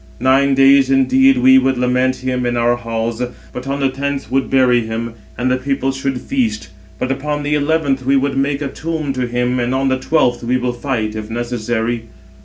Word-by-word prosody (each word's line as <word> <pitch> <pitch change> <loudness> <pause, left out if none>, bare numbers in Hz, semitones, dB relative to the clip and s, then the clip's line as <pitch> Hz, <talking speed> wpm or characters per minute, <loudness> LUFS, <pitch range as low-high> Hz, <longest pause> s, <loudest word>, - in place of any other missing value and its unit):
Nine 135 +2 +3
days 135 0 +5
indeed 260 - +4
we 265 +1 +6
would 135 - 0
lament 125 +1 +1
him 125 -1 -3
in 120 0 -1
our 120 +1 +2
halls, 115 0 -3 0.3
but 125 +2 -7
on 140 +1 -2
the 135 - +2
tenth 140 0 -4
would 135 0 0
bury 125 -2 +3
him, 115 +1 -4 0.2
and 125 +1 0
the 130 - +2
people 135 0 -1
should 135 -1 -3
feast; 230 - -2 0.3
but 130 - -2
upon 145 +2 -3
the 145 +1 -1
eleventh 145 -2 0
we 135 +2 +2
would 135 0 +1
make 140 +2 0
a - - -2
tomb 155 -1 -4
to 130 -1 -2
him, 125 +1 -1
and 120 +2 -1
on 135 0 +1
the 130 0 0
twelfth 125 -7 +1
we 125 +2 +1
will 125 -1 -2
fight, 120 -4 -3
if 110 0 -6
necessary." 120 0 -2
130 Hz, 205 wpm, -17 LUFS, 120-140 Hz, 0.3 s, we